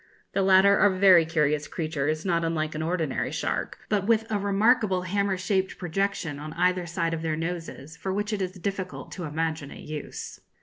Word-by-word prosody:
The 195 - +1
latter 195 +1 +6
are 205 - +6
very 185 -3 +6
curious 150 -2 +1
creatures, 155 0 -2
not 170 -2 +1
unlike 155 -2 -1
an 155 - -4
ordinary 160 -3 -1
shark, - - -2
but 205 -2 0
with 225 -1 +3
a 210 - +1
remarkable 200 -1 +2
hammer 195 +1 0
shaped 190 +1 -1
projection 180 -4 -2
on 155 +1 -7
either 180 +1 +1
side 165 -1 -1
of 165 - -3
their 160 -1 -1
noses 165 -3 -5
for 190 - -3
which 205 +3 -2
it 205 - -2
is 185 -1 -2
difficult 190 0 -5
to 180 - -5
imagine 155 -1 -2
a - - -10
use. 150 -1 -7
180 Hz, 185 wpm, -26 LUFS, 160-195 Hz, -, latter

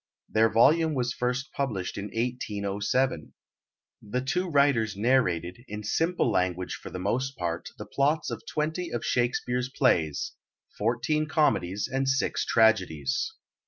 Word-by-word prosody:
Their 110 +1 +3
volume 155 +7 +4
was 125 -1 0
first 125 +4 -2
published 105 -10 -2
in 100 - -4
1807. 105 -2 -1 0.7
The 120 +5 -2
two 180 +8 -1
writers 140 -9 +2
narrated, 105 -5 +1
in 105 -1 -6
simple 165 - +1
language 90 0 0
for - - -8
the - - -6
most 130 +8 -1
part, 85 -1 -3
the - - -7
plots 150 +3 0
of - - -5
twenty 160 +3 -2
of 120 - -3
Shakespeare's 125 0 0
plays, 85 - +1 0.4
fourteen 120 +8 0
comedies 105 - +1
and 135 +1 0
six 130 0 +1
tragedies. 95 - +2
120 Hz, 130 wpm, -27 LUFS, 100-135 Hz, 0.7 s, volume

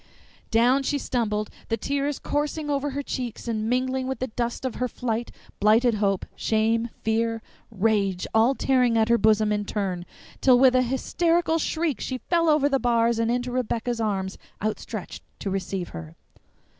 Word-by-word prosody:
Down 245 +4 +4
she 285 +2 0
stumbled, 215 -6 -1 0.2
the 225 - +1
tears 280 +4 -1
coursing 295 +1 -2
over 285 0 0
her 285 +1 -4
cheeks 245 -4 -5
and 220 -1 -1
mingling 260 +1 0
with 265 - -2
the 260 - -2
dust 240 +3 -3
of 255 - -1
her 250 - +2
flight; 235 -1 -3 0.3
blighted 225 +3 +4
hope, 195 -2 +1
shame, 225 +1 +1
fear, 225 0 0 0.3
rage, 200 -3 +1
all 230 +5 +4
tearing 250 -4 +2
her 230 +1 +4
bosom 215 0 +3
in 210 0 0
turn, 190 -4 -3 0.3
till 255 -2 +6
with 260 0 +6
a 255 - +5
hysterical 330 +6 +1
shriek 315 -5 -1
she 260 - -3
fell 335 +4 +1
over 300 -2 +4
the 275 -2 +1
bars 235 -1 +2
and 230 0 +1
into 245 +1 -1
Rebecca's 240 -1 -1
arms 195 -3 -2 0.2
outstretched 215 +1 -4 0.2
to 195 - -4
receive 190 -1 -3
her. 80 0 -9
235 Hz, 165 wpm, -25 LUFS, 215-265 Hz, 0.3 s, till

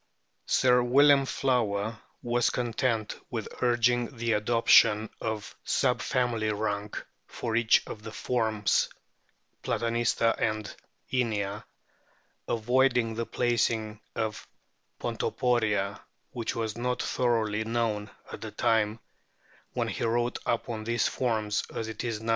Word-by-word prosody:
Sir 125 -1 +4
William 135 +2 +5
Flower 110 -5 0 0.2
was 120 0 +2
content 115 -2 -1
with 115 -3 -4
urging 120 +1 +2
the 115 0 0
adoption 110 0 +4
of 110 -2 -4
sub - - +1
family 115 -4 0
rank 105 -1 -3 0.2
for 115 -1 -4
each 115 -1 +4
of 105 - -8
the 110 +1 -8
forms 110 -3 +1 0.7
Platanista 115 0 +1
and 110 -1 -1 0.4
Inia, 105 -5 -1 0.8
avoiding 120 0 +2
the 115 +1 -3
placing 115 -3 0 0.2
of 110 -2 -3 0.5
Ponto - - -2
poria, 105 -5 0 0.3
which 115 -3 -3
was 110 -2 -2
not 125 +1 -1
so - - -3
thoroughly 110 -4 +1
known 110 -2 -1 0.2
at - - -8
the - - -5
time 110 0 +1 0.7
when - - -1
he - - -3
wrote 120 +1 0
upon 115 -1 -1
these 115 -1 +1
forms 110 -4 0
as 110 - -3
it 110 -1 -5
is 115 -3 -2
now. 115 - -4
115 Hz, 125 wpm, -28 LUFS, 110-120 Hz, 0.8 s, William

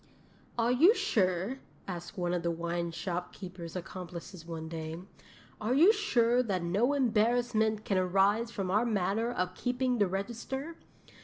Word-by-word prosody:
'"Are 235 +1 +2
you 330 - +6
sure," 190 - 0 0.3
asked 175 -1 -6
one 175 -1 0
of 175 - 0
the 170 - 0
wine 170 +1 -2
shopkeeper's 180 0 -6
accomplices 175 -1 -7
one 160 -1 -5
day, 160 0 -5 0.6
"are 225 +4 +1
you 345 +10 +7
sure 245 - +3
that 195 -7 -1
no 205 +11 +2
embarrassment 225 -3 +2
can 195 -2 +1
arise 195 +5 +2
from 195 -5 -3
our 210 +4 +3
manner 220 +1 0
of 185 -6 -2
keeping 250 +3 -1
the 205 - +4
register? 235 - -4
200 Hz, 145 wpm, -31 LUFS, 180-240 Hz, 0.6 s, you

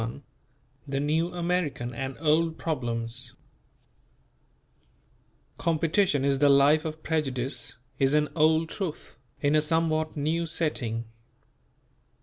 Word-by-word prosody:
XXI 120 +4 -8 0.7
THE 135 0 -1
NEW 160 +4 +1
AMERICAN 170 -8 -1
AND 130 +2 -4
OLD 160 +1 +2
PROBLEMS 120 -4 -3 2.3
"Competition 165 -2 +2
is 140 -1 +2
the 145 0 +5
life 145 +3 +5
of 155 0 -5
prejudice" 135 -6 -2 0.2
is 135 +2 +3
an 150 0 +2
old 160 +1 +3
truth, 175 -5 -5 0.2
in 145 0 +2
a 155 - +5
somewhat 155 0 0
new 160 +3 0
setting. 125 -9 -1
150 Hz, 110 wpm, -27 LUFS, 135-160 Hz, 2.3 s, the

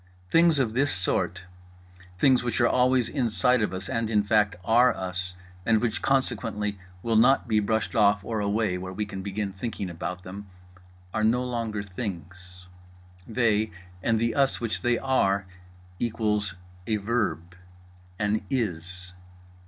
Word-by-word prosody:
Things 165 -2 +5
of 125 -5 +1
this 140 +4 +2
sort—things 90 +5 -1
which 120 -1 -1
are 120 - +5
always 125 -1 +3
inside 125 -1 +2
of 105 - 0
us 95 0 -5
and, 115 -1 -1
in 105 -2 +3
fact, 105 0 +2
are 120 +3 +5
us 90 -1 -4 0.3
and 110 +2 +3
which 115 -2 -1
consequently 105 -6 0 0.2
will 115 -1 +1
not 125 +3 +5
be 110 -2 +2
pushed 110 +3 -1
off 105 -2 +4
or 110 -2 -2
away 100 -2 0
where 95 0 -6
we 105 +3 -2
can 100 -2 -6
begin 100 +1 -3
thinking 95 -2 -4
about 90 +2 -5
them—are 90 0 -9
no 120 +3 +3
longer 115 -4 -3
things; 90 -2 -7 0.6
they, 110 -2 +2 0.3
and 115 +3 +2
the 115 0 +1
us 135 -1 +2
which 115 -2 -2
they 120 -1 +2
are, 100 -8 +1 0.5
equals 105 -4 -1 0.3
A 110 - +1
Verb; 100 -5 -1 0.6
an 105 +1 0
IS. 95 - -3
105 Hz, 145 wpm, -26 LUFS, 95-115 Hz, 0.6 s, Things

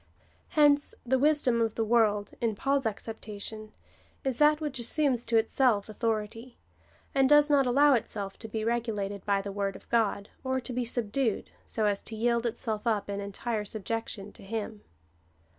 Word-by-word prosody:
^ - - -34 0.5
Hence 290 -1 +4
the 260 +2 +2
wisdom 280 -5 +3
of 225 -2 0
the 225 - 0
world, 215 -3 +2
in 225 -3 0
Paul's 275 +2 +1
acceptation, 215 0 -6 0.5
is 265 -3 -2
that 300 0 +5
which 295 -5 -3
assumes 250 0 0
to 230 - +3
itself 225 -2 +2
authority, 225 +2 -3 0.6
and 270 -1 +3
does 295 0 +6
not 275 -3 +4
allow 280 +3 +5
itself 200 -5 -2
to 225 - -7
be 220 0 -3
regulated 210 -4 -2
by 200 -1 +2
the 200 - -5
word 195 -1 -2
of - - -13
God, 215 -3 +1
or 260 0 0
to 250 0 -6
be 245 0 -1
subdued, 235 0 -1 0.2
so 220 - -1
as 205 -1 +1
to 225 - -5
yield 235 +1 +1
itself 220 0 -3
up 210 -3 0
in 200 - -3
entire 210 +2 -3
subjection 210 -1 -4
to - - -16
him. 215 +1 -5
225 Hz, 175 wpm, -29 LUFS, 210-255 Hz, 0.6 s, does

